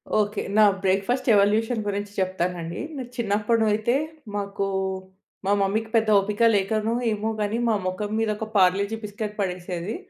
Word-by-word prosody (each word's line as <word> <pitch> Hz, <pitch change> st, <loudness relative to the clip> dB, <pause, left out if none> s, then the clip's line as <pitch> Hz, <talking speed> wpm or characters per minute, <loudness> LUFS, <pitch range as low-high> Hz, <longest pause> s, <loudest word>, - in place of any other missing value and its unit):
Okay. 210 Hz, -1 st, +1 dB, 0.2 s
నా 215 Hz, -, +7 dB, 0.2 s
breakfast 195 Hz, +8 st, +1 dB
evolution 220 Hz, +4 st, +2 dB
గురించి 205 Hz, 0 st, -3 dB
చెప్తానండి. 180 Hz, -2 st, -2 dB, 0.2 s
నా 260 Hz, -, -3 dB
చిన్నప్పుడు 220 Hz, 0 st, +1 dB
అయితే, 220 Hz, +4 st, +1 dB, 0.4 s
మాకు 200 Hz, -1 st, -2 dB, 0.8 s
మా 195 Hz, -, +2 dB
మమ్మీకి 215 Hz, +3 st, 0 dB
పెద్ద 220 Hz, -1 st, +3 dB
ఓపిక 210 Hz, +3 st, -1 dB
లేకనో, 215 Hz, +3 st, 0 dB, 0.2 s
ఏమో 215 Hz, +1 st, -1 dB
గనీ 210 Hz, +2 st, 0 dB
మా 220 Hz, -, +3 dB
మొఖం 205 Hz, +3 st, -3 dB
మీద 225 Hz, -1 st, +1 dB
ఒక 220 Hz, -, -4 dB
పార్లేజి 200 Hz, +3 st, +3 dB
బిస్కట్ 210 Hz, 0 st, -5 dB
పడేసేది. 180 Hz, +1 st, -3 dB
205 Hz, 145 wpm, -24 LUFS, 195-220 Hz, 0.8 s, నా